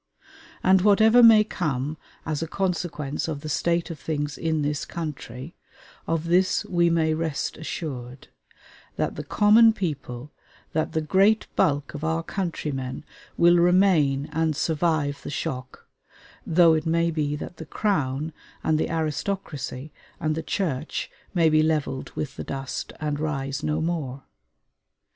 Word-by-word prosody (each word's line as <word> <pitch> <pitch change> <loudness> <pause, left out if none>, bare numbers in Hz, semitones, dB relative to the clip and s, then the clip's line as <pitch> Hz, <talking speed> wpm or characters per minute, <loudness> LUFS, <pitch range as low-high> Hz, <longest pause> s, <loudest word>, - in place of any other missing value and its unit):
And 190 0 +5
whatever 220 +4 +6
may 225 -2 +8
come 150 -8 -2 0.3
as 155 -1 -2
a 165 - -2
consequence 170 -6 -2
of 150 -3 -4
the 155 - -6
state 170 +2 0
of 160 - -8
things 145 -1 -3
in 160 -2 -1
this 145 0 -1
country, 150 -3 -6 0.5
of 165 -1 0
this 180 +3 +2
we 170 -1 +2
may 160 -1 +2
rest 160 -2 -2
assured: 130 -6 -6 0.7
that - - -1
the - - -5
common 220 +2 +5
people, 145 - -5 0.4
that 155 +1 -1
the 160 - +1
great 195 +7 +3
bulk 145 -6 +1
of 150 0 -7
our 160 +1 0
countrymen 150 -9 -4 0.3
will 175 +1 +6
remain 170 -6 +3
and 160 -1 0
survive 150 -3 0
the - - -7
shock, 130 -2 -5 0.6
though 165 0 +6
it 155 +1 0
may 170 +1 +2
be 150 -2 -1
that 150 - -7
the 160 - -8
Crown 155 -7 -1 0.3
and 155 -1 +2
the - - 0
aristocracy 155 -3 -3 0.3
and 155 -2 0
the 160 - -3
Church 155 -6 -2 0.2
may 165 -2 +4
be 155 0 +4
leveled 150 -4 -1
with 150 - -4
the - - -4
dust, 135 -1 -5
and 150 -1 -2
rise 140 -3 -2
no 155 0 -1
more. 150 -6 -3
155 Hz, 145 wpm, -25 LUFS, 145-170 Hz, 0.7 s, may